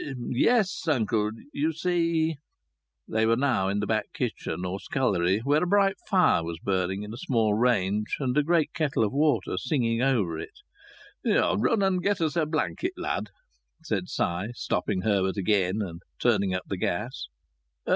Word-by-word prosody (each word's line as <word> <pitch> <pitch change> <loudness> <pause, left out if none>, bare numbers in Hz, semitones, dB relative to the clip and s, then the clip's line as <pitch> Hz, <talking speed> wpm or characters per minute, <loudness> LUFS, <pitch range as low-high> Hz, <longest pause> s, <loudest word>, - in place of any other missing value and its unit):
"Yes, 195 - +2
uncle. 110 -7 +1 0.2
You 155 +3 0
see 165 -2 0 0.4
" - - -57
They 110 0 +1
were 115 - +4
now 120 -7 +1
in 100 +1 0
the - - -1
back 110 +1 -1
kitchen, 90 - -3
or 95 +2 -3
scullery, 100 - +1
where 145 +5 +2
a - - 0
bright 195 +1 +3
fire 185 - +3
was 85 0 -5
burning 95 +2 -1
in 105 +1 -7
a - - -7
small 115 -5 +1
range 105 -3 +1
and 130 -3 -1
a 150 - +5
great 165 +1 +1
kettle 150 -7 0
of 105 - -1
water 140 -10 +1
singing 120 -4 0
over 105 -12 +1
it. - - -9 0.6
"Run 220 -4 +2
and 190 -2 +2
get 200 +1 +1
us 160 -1 0
a 160 -3 +1
blanket, 165 - -2
lad," 350 - -3 0.5
said 100 - -2
Si, 85 +4 -1
stopping 95 -5 -1
Herbert 95 -1 +1
again, 100 +1 +1
and 85 -3 -7 0.2
turning 100 -5 +2
up 95 - -3
the 100 - -4
gas. 90 - -3
115 Hz, 165 wpm, -27 LUFS, 95-155 Hz, 0.6 s, a